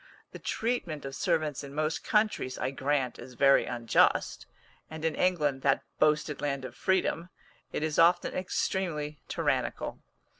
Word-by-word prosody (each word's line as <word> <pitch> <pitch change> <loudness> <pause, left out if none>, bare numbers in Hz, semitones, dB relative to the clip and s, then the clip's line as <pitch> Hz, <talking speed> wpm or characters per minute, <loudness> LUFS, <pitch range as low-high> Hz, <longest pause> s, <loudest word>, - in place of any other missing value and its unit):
The - - -9
treatment 185 - -2
of 135 0 -5
servants 155 -5 0
in 140 0 -9
most 155 +1 -1
countries, 210 - +1
I 130 - -1
grant, 135 -2 -1
is 125 - -10
very 135 +2 +5
unjust, 120 -1 +2 0.4
and 160 0 -6
in 160 - +1
England, 150 -8 +1
that 135 0 +2 0.2
boasted 150 -1 +2
land 140 -2 -2
of - - -7
freedom, 180 -2 0 0.4
it - - -2
is 155 -1 0
often 175 +1 +4
extremely 170 -5 -2
tyrannical. - - -1
150 Hz, 145 wpm, -29 LUFS, 135-175 Hz, 0.4 s, very